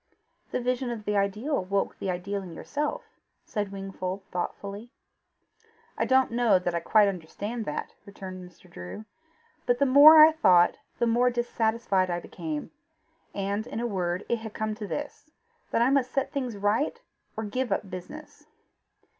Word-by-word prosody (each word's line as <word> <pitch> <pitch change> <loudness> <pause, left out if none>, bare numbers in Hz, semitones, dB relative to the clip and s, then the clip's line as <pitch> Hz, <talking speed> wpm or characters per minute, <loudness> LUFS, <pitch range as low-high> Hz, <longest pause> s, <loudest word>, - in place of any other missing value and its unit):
"The - - -2
vision 250 +1 -1
of 225 -3 -5
the 210 - 0
ideal 210 +6 0
woke 195 +1 -1
the 195 - -3
ideal 190 +3 -3
in 175 -3 -9
yourself," 295 - -3 0.4
said 205 -3 -3
Wingfold 195 -1 -5
thoughtfully. 200 +5 -5 1.1
"I - - 0
don't 260 -1 +3
know 235 -4 +4
that 180 -1 -2
I 170 - 0
quite 210 +4 +4
understand 200 +5 -4
that," 150 - -4
returned 185 -2 -9
Mr. 175 - -22
Drew; 90 - -9 0.6
"but 245 0 +3
the 280 - +3
more 290 +4 +9
I 310 +1 +10
thought 185 - +4 0.2
the 240 - +1
more 240 +2 +3
dissatisfied 225 -5 0
I 175 0 -1
became. 300 - -6 0.6
And, 200 +3 -2
in 230 - -5
a 240 - -2
word, 185 -4 -2
it 235 - +1
has 220 -1 -8
come 215 -1 -2
to 210 -1 -6
this, 295 +5 -6 0.4
that 230 - +2
I 255 - +3
must 270 -3 +2
set 275 - -1
things 255 -6 -3
right, 215 - 0 0.4
or 220 - -2
give 240 +3 -2
up 195 +1 -1
business." 190 +13 -10
215 Hz, 165 wpm, -27 LUFS, 190-245 Hz, 1.1 s, I